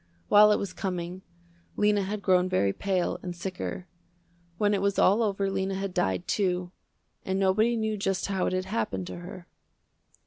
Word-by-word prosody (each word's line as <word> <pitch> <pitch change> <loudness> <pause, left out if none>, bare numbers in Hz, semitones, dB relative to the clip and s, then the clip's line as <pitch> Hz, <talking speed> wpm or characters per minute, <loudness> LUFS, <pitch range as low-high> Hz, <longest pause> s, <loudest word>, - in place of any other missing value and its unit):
While 210 +1 +7
it 210 - +4
was 195 -2 -4
coming, 180 -1 -4 0.6
Lena 210 -1 +3
had 200 +1 -4
grown 185 -1 +3
very 100 - +1
pale 190 -3 -1
and 180 -1 -6
sicker. 180 0 -5 0.7
When 205 +1 +2
it 200 - 0
was 200 0 0
all 205 +5 +4
over 200 -3 0
Lena 190 0 -1
had 195 -1 -3
died, 95 - 0
too, 180 -3 0 0.5
and 190 0 -1
nobody 215 +5 +2
knew 220 -1 -1
just 195 -1 -1
how 195 -2 -1
it - - -1
had 185 0 -1
happened 190 - -2
to - - -7
her. 175 0 -9
190 Hz, 175 wpm, -27 LUFS, 180-205 Hz, 0.7 s, While